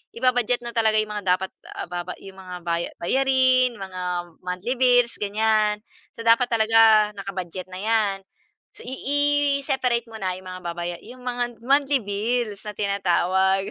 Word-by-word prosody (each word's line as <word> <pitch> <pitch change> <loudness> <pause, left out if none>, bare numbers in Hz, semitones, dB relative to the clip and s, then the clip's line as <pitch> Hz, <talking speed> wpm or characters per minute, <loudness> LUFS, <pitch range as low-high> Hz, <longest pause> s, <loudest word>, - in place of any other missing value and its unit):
i-ba-budget 245 0 +2
na 235 - -5
talaga 220 -1 +3
yung 215 0 -2
mga 205 -2 -5
dapat 190 +1 -6 0.4
baba 175 0 -5
yung 195 -1 -12
mga 185 -1 -8
baya 170 0 -1
bayarin, 260 +3 +3
mga 190 -2 -6 0.4
monthly 185 +8 -2
bills 245 -2 +4
ganyan. 210 0 +1 0.4
So, - - -8
dapat 230 +2 +5
talaga 220 -1 +5
naka-budget 185 -2 -5
na 185 - -7
yan 215 -1 +1 0.6
so, - - -12
i 250 - -6 0.7
i-separate 250 -3 0
mo 220 - -8
na 185 -2 -2
yung 185 - -12
mga 185 0 -8
babaya 175 0 -4
yung 250 0 -12
mga 245 -1 -3
monthly 275 +1 +3
bills 210 +1 -2
na 210 - -4
tinatawag. 190 -1 +1
215 Hz, 155 wpm, -24 LUFS, 190-245 Hz, 0.7 s, dapat